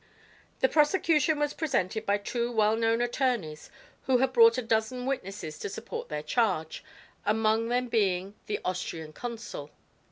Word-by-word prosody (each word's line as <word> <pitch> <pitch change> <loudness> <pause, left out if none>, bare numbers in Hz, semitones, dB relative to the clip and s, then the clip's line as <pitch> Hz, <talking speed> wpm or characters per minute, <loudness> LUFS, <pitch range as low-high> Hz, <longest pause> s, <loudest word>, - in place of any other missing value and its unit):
The 260 - +6
prosecution 305 0 +3
was 295 0 0
represented 220 - -1
by 200 +1 +3
two 235 +4 -2
well 215 -1 +3
known 225 +1 +1
attorneys 240 - -1 0.4
who 260 -1 +4
had 260 +1 +1
brought 230 -1 +7
a 255 - -1
dozen 225 +2 0
witnesses 195 - -4
to - - -4
support - - -6
their 150 0 -4
charge, 170 -3 0 0.4
among 220 +1 +2
them 250 +1 +1
being 195 -4 0
the 210 - -2
Austrian 165 -4 -4
consul. 220 -11 -6
225 Hz, 150 wpm, -28 LUFS, 195-250 Hz, 0.4 s, brought